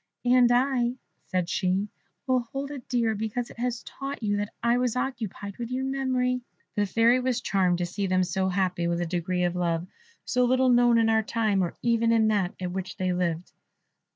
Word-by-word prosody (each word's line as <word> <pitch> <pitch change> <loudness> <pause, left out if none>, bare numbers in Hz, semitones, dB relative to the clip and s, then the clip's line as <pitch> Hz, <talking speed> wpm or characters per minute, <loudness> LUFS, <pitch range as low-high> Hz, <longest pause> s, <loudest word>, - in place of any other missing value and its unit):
"And 245 -1 +5
I," 245 -1 +2 0.3
said 180 -2 -1
she, 190 +2 0 0.4
"will 255 -1 +2
hold 270 +4 -5
it 275 -4 -9
dear, 235 -3 +1
because 220 +3 -3
it - - -14
has 240 -1 -2
taught 275 -2 -6
you 205 -1 +1
that 205 0 -3
I 235 +1 +3
was 250 -2 0
occupied 220 -6 -4
with 235 -1 -4
your 255 +1 -2
memory." 255 -2 0 0.3
The 205 -2 0
Fairy 230 +5 +4
was 250 -1 0
charmed 185 -6 +1
to 175 - -1
see 195 +3 -3
them 185 0 +2
so 190 +1 0
happy, 180 -2 0
with 170 0 0
a 175 - -1
degree 180 +1 -1
of 175 0 0
love 170 -1 0 0.4
so 250 -1 +1
little 255 +1 +3
known 240 -1 +5
in 225 -1 +3
our 220 0 +3
time 215 -3 +1
or 175 - -3
even 230 -1 +2
in 220 -1 +4
that 200 -4 0
at 180 -1 -3
which 185 0 -5
they 185 -1 0
lived. 175 -1 -2
225 Hz, 205 wpm, -27 LUFS, 185-245 Hz, 0.4 s, And